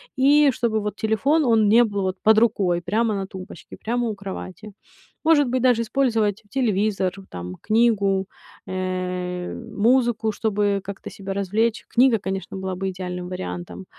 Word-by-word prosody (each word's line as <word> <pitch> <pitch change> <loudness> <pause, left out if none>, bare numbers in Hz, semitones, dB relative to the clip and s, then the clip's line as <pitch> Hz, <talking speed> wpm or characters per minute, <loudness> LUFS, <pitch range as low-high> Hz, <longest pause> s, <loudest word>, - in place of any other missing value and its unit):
и 285 +2 +5
чтобы, 225 -2 0
вот, 210 0 -4
телефон, 270 +9 +1
он 225 -3 +4
не 230 +3 +6
был, 205 -3 -2
вот, 190 0 -2
под 220 0 +5
рукой 200 -6 +2
прямо 215 +6 0
на 195 -1 -2
тумбочке, 190 -1 -10
прямо 240 +2 -1
у 220 - -3
кровати. 195 +1 -8 0.5
Может 295 -5 +4
быть, 255 +1 0
даже 245 -2 +3
использовать 225 -4 0
телевизор, 210 -6 0 0.2
там, 90 +1 -7
книгу, 205 -4 +2 0.4
э, 180 -1 -3
музыку, 230 0 +1
чтобы 205 -1 0
как-то 200 0 -7
себя 195 -1 -6
развлечь. 210 +4 0
Книга, 245 -2 +4
конечно, 195 0 -5
была 190 -1 -4
бы 195 +1 -2
идеальным 180 -1 -5
вариантом. 90 - -6
210 Hz, 150 wpm, -23 LUFS, 190-230 Hz, 0.5 s, не